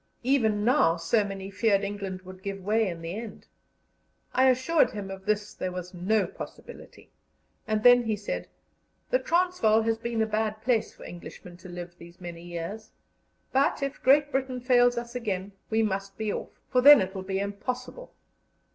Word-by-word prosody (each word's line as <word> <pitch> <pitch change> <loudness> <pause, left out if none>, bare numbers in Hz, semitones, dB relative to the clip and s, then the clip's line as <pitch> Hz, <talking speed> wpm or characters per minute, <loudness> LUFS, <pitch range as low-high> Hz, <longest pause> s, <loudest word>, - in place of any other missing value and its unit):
Even 220 -6 +2
now, 245 - +4
so 185 +7 +2
many 195 -1 -6
feared 200 0 +2
England 195 -2 -5
would 185 0 -11
give 195 -1 -5
way 220 +3 +2
again 180 -4 -3
in 165 - -12
the 165 +1 -4
end. 230 -2 -9 0.9
I 260 +1 +5
assured 260 +6 +3
him 200 -2 -6
of 195 +1 -9
this 210 0 0
there 185 - -4
was 180 0 -7
no 195 +5 +1
possibility, - - -11 0.6
and 215 -1 0
then 245 -1 +7
he 220 -1 0
said: 205 0 -5 0.6
"The - - +4
Transvaal 340 - +2
has 225 0 0
been 230 -1 -1
a - - +1
bad 215 0 -1
place 235 -3 +1
for - - -15
Englishmen 175 0 -10
to 185 +1 -12
live 175 0 -7
these 170 +1 -14
many 175 -2 -8
years; 175 +5 -6 0.6
but 275 +1 +2
if 275 0 -4
Great 290 +2 +4
Britain 260 -1 -1
fails 245 -1 +4
us 235 0 -4
again, 200 -5 -3 0.2
we 225 0 +2
must 195 -1 -3
be 215 -2 -2
off, - - -5 0.2
for 250 - +4
then 290 +1 +10
it 190 0 -2
will 190 - -5
be 190 0 -3
impossible." 225 - -5
215 Hz, 180 wpm, -27 LUFS, 190-245 Hz, 0.9 s, then